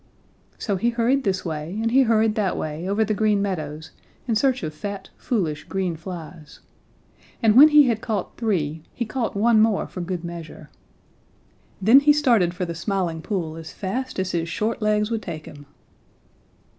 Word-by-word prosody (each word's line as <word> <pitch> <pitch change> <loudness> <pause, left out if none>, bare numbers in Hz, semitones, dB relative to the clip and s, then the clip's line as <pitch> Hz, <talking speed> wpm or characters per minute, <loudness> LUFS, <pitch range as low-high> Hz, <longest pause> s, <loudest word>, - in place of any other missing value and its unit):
So 200 -4 -2
he 235 +6 +1
hurried 240 +3 +1
this 190 -2 -1
way 160 +3 -4
and 225 +1 0
he 265 +2 +5
hurried 225 -3 +3
that 205 -4 -1
way 155 +4 -4
over 215 +2 +2
the 215 - 0
Green 210 -1 +2
Meadows 160 -6 -4 0.4
in 235 - +1
search 260 +2 +1
of 155 -1 -4
fat, 200 +5 -7
foolish, 170 - -2
green 185 -3 -2
flies. 165 -2 -9 0.8
And 220 -1 +5
when 285 +5 +10
he 300 -1 +7
had 225 -3 0
caught 210 -5 -3
three, 165 -9 -1
he 235 - -2
caught 230 0 -3
one 220 +2 +4
more 220 -2 +2
for 180 - -7
good 175 -1 -4
measure. 170 -2 -9 1.1
Then 220 +8 +7
he 295 +1 +5
started 235 - +2
for 180 - -2
the 170 - -4
Smiling 170 -2 -2
Pool 165 -5 -3
as 160 -1 -9
fast 255 +7 -4
as 190 -1 -1
his 170 -1 -2
short 215 +7 -2
legs 210 +1 +1
would 225 -1 -1
take 155 -6 -7
him. 145 -1 -12
200 Hz, 180 wpm, -23 LUFS, 170-225 Hz, 1.1 s, when